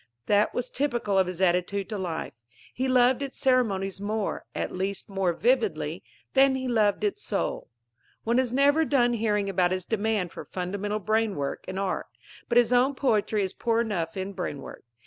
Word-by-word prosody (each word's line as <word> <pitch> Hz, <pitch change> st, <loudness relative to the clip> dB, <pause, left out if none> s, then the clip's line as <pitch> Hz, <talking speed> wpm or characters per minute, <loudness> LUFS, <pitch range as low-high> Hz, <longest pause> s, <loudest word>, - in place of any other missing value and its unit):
That 205 Hz, +5 st, +2 dB
was 245 Hz, 0 st, -2 dB
typical 240 Hz, -8 st, 0 dB
of 190 Hz, -, +3 dB
his 180 Hz, 0 st, -5 dB
attitude 185 Hz, +2 st, +1 dB
to 215 Hz, -, -3 dB
life. 170 Hz, -4 st, -4 dB, 0.4 s
He 260 Hz, +2 st, -1 dB
loved 255 Hz, 0 st, +4 dB
its 275 Hz, -1 st, -5 dB
ceremonies 200 Hz, -7 st, +1 dB
more 210 Hz, 0 st, -2 dB
at -, -, -2 dB
least, 190 Hz, +1 st, -3 dB
more 195 Hz, -3 st, 0 dB
vividly 185 Hz, -, 0 dB, 0.3 s
than 270 Hz, 0 st, +5 dB
he 260 Hz, 0 st, -3 dB
loved 220 Hz, -, +2 dB
its 415 Hz, 0 st, -1 dB
soul. -, -, -2 dB, 0.5 s
One 235 Hz, +2 st, +2 dB
is 255 Hz, -2 st, 0 dB
never 285 Hz, +4 st, +4 dB
done 245 Hz, -5 st, +2 dB
hearing 210 Hz, -3 st, 0 dB
about 185 Hz, -2 st, +2 dB
his 185 Hz, 0 st, -2 dB
demand 215 Hz, -5 st, -1 dB
for -, -, -8 dB
"fundamental 200 Hz, +3 st, -3 dB
brainwork" 210 Hz, -8 st, -1 dB
in 185 Hz, -, -5 dB
art. 195 Hz, -1 st, -2 dB, 0.4 s
But 240 Hz, -, +2 dB
his 245 Hz, 0 st, +4 dB
own 255 Hz, +3 st, +3 dB
poetry 215 Hz, -5 st, +1 dB
is 190 Hz, -, -3 dB
poor 230 Hz, -1 st, 0 dB
enough 190 Hz, -7 st, -2 dB
in 190 Hz, +1 st, -4 dB
brainwork. 145 Hz, -6 st, -6 dB
210 Hz, 175 wpm, -27 LUFS, 190-245 Hz, 0.5 s, than